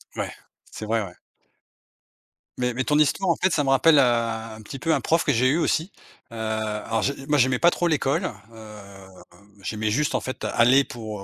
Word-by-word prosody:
Ouais, - - -3 0.4
c'est 110 - -7
vrai, 110 +1 0
ouais. 90 -2 -11 1.4
Mais 125 -1 0
mais 130 +2 -1
ton 150 - +1
histoire, 155 +5 +2
en 170 - +3
fait, 190 - +1
ça 145 - +1
me 135 - -1
rappelle, 145 +3 +5
heu, - - +7
un 115 -3 -1
petit 135 +6 -8
peu 165 - 0
un - - +1
prof 165 +1 +1
que 145 - +1
j'ai 125 +1 +2
eu 140 +5 +2
aussi. 165 +3 0 0.4
Heu, - - -10
alors, 110 0 -2
je 140 - 0 0.2
moi 150 - +3
j'aimais 125 -1 +2
pas 175 - +6
trop 175 0 -1
l'école. 160 +3 0 0.2
Hem, 100 -4 -13 0.4
j'aimais 105 +2 -2
juste 150 +7 0
en - - 0
fait, 130 - -6
aller 130 +4 +4
pour, 110 -5 -8
heu, - - -8
120 Hz, 210 wpm, -24 LUFS, 110-145 Hz, 1.4 s, heu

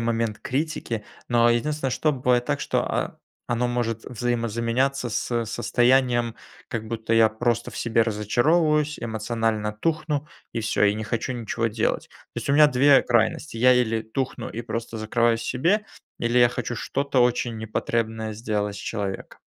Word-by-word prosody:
момент 115 -2 -1
критики, 130 -5 -3 0.2
но 120 -1 +4
единственное, 135 +3 0
что 155 +4 +1
бывает 125 -2 +1
так, - - -1
что, - - 0
а, - - -2 0.3
оно 120 0 +1
может 115 -2 -2
взаимозаменяться 120 +2 -1
с 115 +1 -1
состоянием, 120 0 +2 0.3
как 110 -1 -4
будто 115 0 -1
я 115 -1 +6
просто 120 +1 -1
в - - -8
себе 115 0 +2
разочаровываюсь, 150 - +2
эмоционально 110 -1 -1
тухну 150 +4 -1 0.3
и 115 - -2
всё, 105 -1 0
и 100 0 +3
не 110 +1 -4
хочу 115 +4 -2
ничего 115 -1 -2
делать. 110 +1 -1
То - - -11
есть - - -3
у - - +3
меня 150 +1 +7
2 140 0 +5
крайности: 115 +3 +1
я 125 +2 +6
или 115 -3 +1
тухну 130 +4 -4
и 120 - -5
просто 115 -1 -5
закрываюсь 115 +1 +1
в - - -6
себе 180 +12 +1 0.3
или 120 +1 +1
я 120 0 +7
хочу 120 0 -4
что-то 140 +3 0
очень 120 -1 +1
непотребное 110 0 -2
сделать 105 -2 -2
с - - -7
человеком. 100 -3 -5
120 Hz, 165 wpm, -24 LUFS, 110-125 Hz, 0.3 s, меня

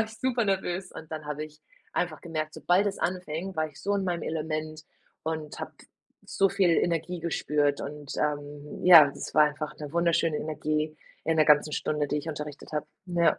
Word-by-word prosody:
War 220 - +3
ich 220 0 -11
super 250 -2 +1
nervös. 190 -1 -1
Und 160 0 -10
dann 155 -1 -5
habe 150 +1 -3
ich 150 0 -14 0.3
einfach 160 -4 -2
gemerkt, 155 -2 -3
sobald 185 +4 +2
es 200 - -2
anfing, 180 0 -3
war 155 - +1
ich 140 - -16
so 200 +1 +1
in 195 -1 0
meinem 175 -3 -1
Element 155 0 -3 0.4
und 155 -1 -4
habe - - -5 0.5
so 195 - +2
viel 190 -2 +3
Energie 170 +1 +1
gespürt. 150 -3 +1
Und, 145 0 -7
ähm, 145 0 -3
ja, 165 -5 +10
es - - -7
war 155 - +7
einfach 150 0 -3
'ne 150 0 -7
wunderschöne 170 -2 +2
Energie 155 0 -2 0.3
in 160 +1 +1
der 155 - +6
ganzen 150 0 +5
Stunde, 150 -1 0
die 150 - 0
ich 155 +2 -6
unterrichtet 150 -1 -6
habe. 150 - -2 0.2
Ja. 175 -2 +3
155 Hz, 195 wpm, -28 LUFS, 150-175 Hz, 0.5 s, ja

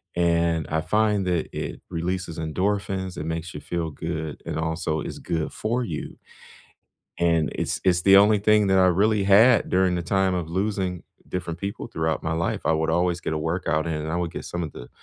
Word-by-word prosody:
and 85 -2 +1
I 80 0 0
find 105 0 +1
that 90 -3 0
it - - -5
releases 85 0 -3
endorphins, 95 +3 -2
it - - -3
makes 80 0 -4
you - - -4
feel 85 0 -3
good, 80 0 -5
and - - -3
also 80 -1 -1
is - - -6
good 80 -2 -3
for 120 +3 -1
you 80 -10 -5 1.0
and 85 -2 +2
it's - - -2
it's 90 -1 +3
the 95 - +6
only 105 +1 +5
thing 105 0 +4
that 95 - +3
I 95 - +6
really 100 +3 +2
had 110 +5 +5
during 95 -1 +3
the 85 - -1
time 95 +1 +1
of 85 -3 -3
losing 95 -1 -1 0.3
different 85 -2 -4
people 100 +1 -5
throughout 80 0 -2
my 80 0 -1
life. 85 +1 -1
I - - +4
would 80 0 0
always 85 +1 +1
get - - -2
a 80 - -1
workout 80 -1 -1
in, 80 - -1
and 75 +1 -3
I - - 0
would 85 -2 -1
get - - -7
some 85 0 -4
of 75 - -5
the - - -10
85 Hz, 210 wpm, -24 LUFS, 80-95 Hz, 1.0 s, the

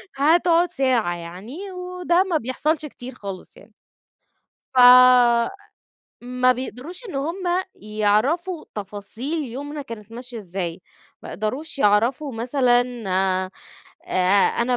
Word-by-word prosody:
هتقعد 335 +4 +3
ساعة 255 - +1
يعني 205 - -8
وده 360 -1 0
ما 365 -4 0
بيحصلش 300 +5 -1
كتير 255 -2 -10
خالص 195 -6 -9
يعني. 210 +2 -18 1.0
ف - - +4 1.4
ما 250 +1 +2
بيقدروش 260 - -7
إن 365 - -8
هم 295 +6 -2 0.4
يعرفوا 215 - 0
تفاصيل 215 - -5
يومنا 285 +4 -6
كانت 225 -4 -10
ماشية 245 +1 -9
إزاي، 180 -3 -5 0.4
ما - - -9
يقدروش 265 +9 -4
يعرفوا 245 +6 +2
مثلًا، 245 +1 +2 1.2
آآ، 185 +2 +3
أنا 250 +1 +1
255 Hz, 105 wpm, -22 LUFS, 215-310 Hz, 1.4 s, ف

